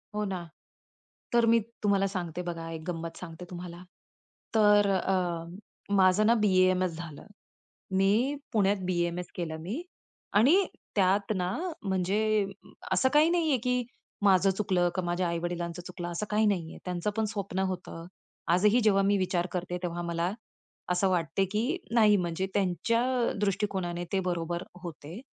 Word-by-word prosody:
हो 210 - 0
ना. 185 -3 -4 0.9
तर 235 -1 +5
मी 230 - +6 0.2
तुम्हाला 200 -1 +3
सांगते 180 -3 -4
बघा, 165 -1 -5
एक 160 -1 -6
गंमत 165 -1 -4
सांगते 175 0 -8
तुम्हाला. 175 0 -8 0.7
तर, 205 -2 +5
अ, 185 +1 -2
माझं 190 +2 +5
ना 230 - +6
बी-ए-एम-एस 185 -2 +3
झालं. 165 -4 -8 0.7
मी 215 +9 +3 0.2
पुण्यात 205 -1 +3
बी-एम-एस 175 -1 -1
केलं 160 -3 -3
मी 215 - -4 0.6
आणि 335 - +5 0.3
त्यात 200 +1 +2
ना 180 -1 -1 0.3
म्हणजे 200 +2 +1 0.5
असं 260 - +3
काही 305 +2 +6
नाहीये 325 -5 +2
की 250 -1 +1 0.4
माझं 195 -1 +5
चुकलं, 185 -3 +1
का 185 - 0
माझ्या 175 +1 -1
आई-वडिलांचं 170 0 -3
चुकलं, 175 -1 -6
असं 170 +5 -3
काही 215 +1 +2
नाहीये. 175 -6 -1
त्यांचं 180 +2 -2
पण 220 - +2
स्वप्न 195 -2 -3
होतं. 170 -2 -7 0.5
आजही 210 +6 +4
जेव्हा 200 -2 +4
मी 200 +1 +3
विचार 185 -2 0
करते, 180 0 -3
तेव्हा 175 -1 -3
मला 170 +1 -1 0.6
असं 185 +2 +2
वाटते 175 +1 +1
की 240 - 0 0.2
नाही 210 -3 +6
म्हणजे 175 0 -1
त्यांच्या 200 +5 +1 0.4
दृष्टिकोनाने 190 -4 -1
ते 195 - +3
बरोबर 175 0 -2 0.2
होते. 170 +1 -8
185 Hz, 140 wpm, -29 LUFS, 175-210 Hz, 0.9 s, मी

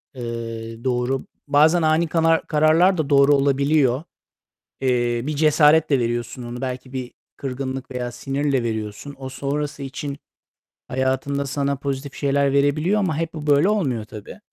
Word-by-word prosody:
eee, 115 -1 -6
doğru. 130 +1 -1 0.2
Bazen 155 +4 +4
ani 160 +1 +2
kanar 165 0 +2
kararlar 160 +5 +4
da 155 -3 -1
doğru 140 0 +5
olabiliyor. 140 -1 +2 0.8
Eee, 120 -2 +1
bir 155 - -2
cesaretle 150 -1 +4
veriyorsun 120 +1 -3
onu. 120 +1 -7
Belki 130 0 -5
bir 130 -2 -5 0.2
kırgınlık 130 -1 -5
veya 125 -1 -3
sinirle 135 0 -1
veriyorsun. 110 +4 -4
O 130 -1 -6
sonrası 140 +2 -3
için 140 +1 -5 0.7
hayatında 130 +2 -1
sana 140 +1 -1
pozitif 140 0 -4
şeyler 140 -1 +1
verebiliyor 150 +8 +2
ama 180 -7 0
hep 165 0 -2
bu 155 -2 -7
böyle 145 +6 +4
olmuyor 135 - 0
tabii. 105 - -10
140 Hz, 140 wpm, -22 LUFS, 125-150 Hz, 0.8 s, doğru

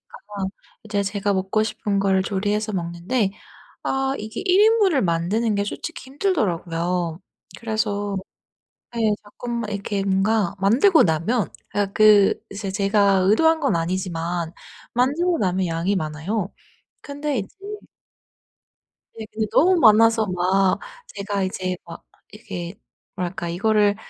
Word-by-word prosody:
있다가 200 -2 -5 0.4
이제 205 -2 -1
제가 200 0 -1
먹고 195 +3 +1
싶은 210 -2 -2
걸 195 -1 +2
조리해서 210 +2 -1
먹는데 185 +5 -1 0.5
아 270 0 0
이게 220 +1 -6
1 375 +1 +4
인분을 420 - +4
만드는 190 +6 0
게 200 - 0
솔직히 325 +10 -6
힘들더라고요. 180 - -1 0.4
그래서 205 -3 -2 0.8
네. 225 -2 +1
자꾸만 235 +1 -5
이렇게 200 0 -2
뭔가 195 0 +1
만들고 265 - +5
나면 170 +5 0 0.2
아 205 0 +2
그 210 -2 +6 0.2
제 200 -2 -4
제가 200 0 +3
의도한 320 +9 +4
건 275 - +1
아니지만 170 -1 -2 0.4
만들고 310 +8 +1
나면 185 -1 +1
양이 170 +5 0
많아요. 175 +5 -3 0.5
근데 285 -1 -3
이제 195 - -5 1.7
예 220 - -5
근데 220 0 -2
너무 365 +3 +4
많아서 225 -2 +5
막 185 +1 +2 0.3
제가 200 -1 -3
이제 185 -1 -2
막 165 - -10 0.3
이게 195 -5 -7 0.4
뭐랄까 180 0 -4
이거를 205 +3 +2
205 Hz, 260 characters per minute, -22 LUFS, 185-225 Hz, 1.7 s, 그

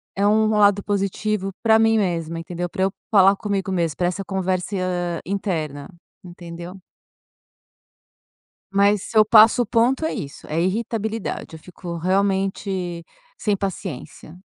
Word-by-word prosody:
é 200 +1 +2
um 215 +1 +3
lado 205 -2 +4
positivo 200 0 -1
pra 220 -1 +5
mim 225 0 +4
mesma, 170 -4 -1
entendeu? 175 +1 -4
Para 190 0 -2
eu 195 - +1 0.2
falar 195 -1 +6
comigo 195 -2 -2
mesma, 170 -4 0
para 175 - 0
essa 195 +2 -3
conversa 185 -2 -2
interna, 160 -7 -3 0.4
entendeu? 175 0 -9 2.0
Mas 200 0 +3
se 225 - -3
eu 215 - +7
passo 220 +3 +6
o - - -7
ponto, 245 +7 +2
é - - -1
isso, 140 -1 -7
é 160 +2 -1
irritabilidade, 220 -1 -3
eu 160 - -10
fico 175 0 -8
realmente 190 -1 -1 0.3
sem 210 -2 0
paciência. 180 -3 -6
190 Hz, 135 wpm, -22 LUFS, 175-210 Hz, 2.0 s, eu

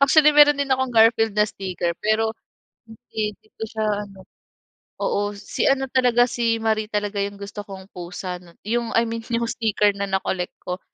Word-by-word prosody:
Actually, 300 +2 +6
meron 295 -1 +7
din 280 -1 -1
akong 260 -1 0
Garfield 225 -1 +4
na 210 - +5
sticker, 180 -4 -3
pero 220 +1 +1 0.5
hindi 220 -2 -5
'di - - -27
ko - - -5
siya 220 0 -3 0.2
ano. 195 -1 -15 0.8
Oo 205 0 0
si 200 0 -2
ano 270 0 +3
talaga, 245 -2 +4
si 230 -1 +1
Marie 220 -1 0
talaga 205 -1 -1
'yong 200 0 -3
gusto 200 +1 -7
kong 195 -1 -10
pusa 180 +1 -6
'no. 175 -1 -17
'Yong 235 +2 -1
I 230 - +5
mean 230 0 -4
'yong 235 0 -1
sticker 210 -2 +2
na 200 0 -2
na-collect 190 -2 -2
ko. 180 +1 -4
220 Hz, 180 wpm, -23 LUFS, 200-235 Hz, 0.8 s, meron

